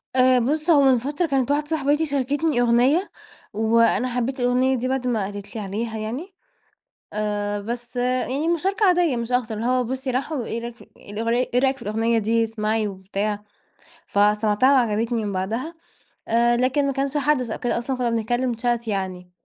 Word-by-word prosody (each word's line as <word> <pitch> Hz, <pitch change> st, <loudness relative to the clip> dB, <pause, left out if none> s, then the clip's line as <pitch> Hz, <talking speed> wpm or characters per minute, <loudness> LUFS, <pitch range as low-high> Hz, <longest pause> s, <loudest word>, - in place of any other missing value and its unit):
آآ 255 Hz, 0 st, +5 dB
بُص، 300 Hz, +7 st, -1 dB
هو 295 Hz, -4 st, +6 dB
من 265 Hz, -2 st, +5 dB
فترة 290 Hz, +8 st, -1 dB
كانت 270 Hz, -2 st, 0 dB
واحدة 295 Hz, +1 st, +1 dB
صاحبتي 295 Hz, 0 st, +1 dB
شاركتني 285 Hz, 0 st, 0 dB
أغنية، 250 Hz, +10 st, +3 dB, 0.4 s
وأنا 230 Hz, +2 st, +2 dB
حبيت 255 Hz, +2 st, -1 dB
الأغنية 250 Hz, +2 st, +2 dB
دي 250 Hz, +2 st, -2 dB
بعد 260 Hz, -1 st, -1 dB
ما 225 Hz, -5 st, 0 dB
قالت 200 Hz, +2 st, -8 dB
لي 215 Hz, -, -3 dB
عليها 220 Hz, +3 st, -4 dB
يعني. 250 Hz, -, -5 dB, 0.8 s
آآ 205 Hz, -1 st, -2 dB
بس 240 Hz, +3 st, -6 dB
يعني 255 Hz, +4 st, 0 dB
مشاركة 385 Hz, +5 st, +1 dB
عادية 345 Hz, -8 st, +3 dB
مش 235 Hz, +1 st, -4 dB
أكتر، 240 Hz, -3 st, 0 dB
اللي 220 Hz, -, -4 dB
هو 255 Hz, 0 st, +2 dB
بُصّي، 260 Hz, +2 st, -3 dB
راحوا 260 Hz, 0 st, -2 dB
إيه 230 Hz, +1 st, -4 dB
رأيك 235 Hz, 0 st, -6 dB
ف -, -, -16 dB
الأغني 230 Hz, +4 st, -2 dB
إيه 250 Hz, -, +4 dB
رأيك 270 Hz, 0 st, +2 dB
في 265 Hz, -, -17 dB
الأغنية 225 Hz, +2 st, 0 dB
دي، 225 Hz, +1 st, +2 dB
اسمعي 220 Hz, -1 st, -1 dB
وبتاع. 200 Hz, +2 st, -3 dB, 0.6 s
فسمعتها 210 Hz, +5 st, +3 dB
وعجبتني 230 Hz, -2 st, +1 dB
من 205 Hz, -, -2 dB
بعدها، 225 Hz, -, -3 dB, 0.5 s
آآ 235 Hz, +1 st, +3 dB
لكن 265 Hz, +3 st, +1 dB
ما 275 Hz, -, 0 dB
كانش 275 Hz, +2 st, -1 dB
حدث 275 Hz, -5 st, +1 dB
أو -, -, -3 dB
كده 245 Hz, -, -1 dB
أصلًا 250 Hz, +2 st, -2 dB
كنا 245 Hz, -2 st, 0 dB
بنتكلم 240 Hz, +2 st, 0 dB
chat 235 Hz, 0 st, -1 dB
يعني، 185 Hz, -3 st, -4 dB
240 Hz, 180 wpm, -23 LUFS, 220-270 Hz, 0.8 s, هو